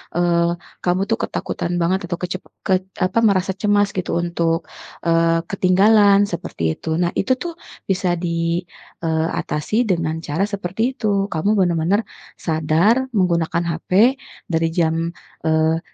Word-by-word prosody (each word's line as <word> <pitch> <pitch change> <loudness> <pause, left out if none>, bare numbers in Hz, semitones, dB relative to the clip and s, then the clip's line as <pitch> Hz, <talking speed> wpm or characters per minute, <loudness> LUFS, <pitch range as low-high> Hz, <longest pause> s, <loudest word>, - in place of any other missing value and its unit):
eee, 170 0 +2 0.3
kamu 180 +1 +1
tuh 225 - +3
ketakutan 170 - -3
banget 180 +2 0
itu 175 - -2
kecep 180 +1 -4 0.2
kec 185 -1 +2 0.2
apa 185 +5 +1
merasa 190 -2 +2
cemas 205 0 +2
gitu 185 - -2
untuk, 170 -1 -1 0.4
eee, 165 0 +3
ketinggalan 200 +1 +5
seperti 170 - -5 0.2
itu. - - -6
Nah 175 0 +1
itu 225 - +2
tuh 345 -1 -4 0.4
bisa 185 -2 +1
di, 170 0 -1 0.4
eee, 160 0 +1
atasi 175 +8 -1
dengan 165 -3 0
cara 160 +6 -1
seperti 195 -1 -4
itu. 220 - -2 0.3
Kamu 160 +5 0
benar-benar 175 +3 +2 0.4
sadar 160 +6 +2 0.2
menggunakan 170 -2 +1
HP 165 - -13 0.6
dari 165 0 +2
jam, 165 -1 +1 0.5
eee, 160 +1 +2
175 Hz, 135 wpm, -20 LUFS, 165-190 Hz, 0.6 s, ketinggalan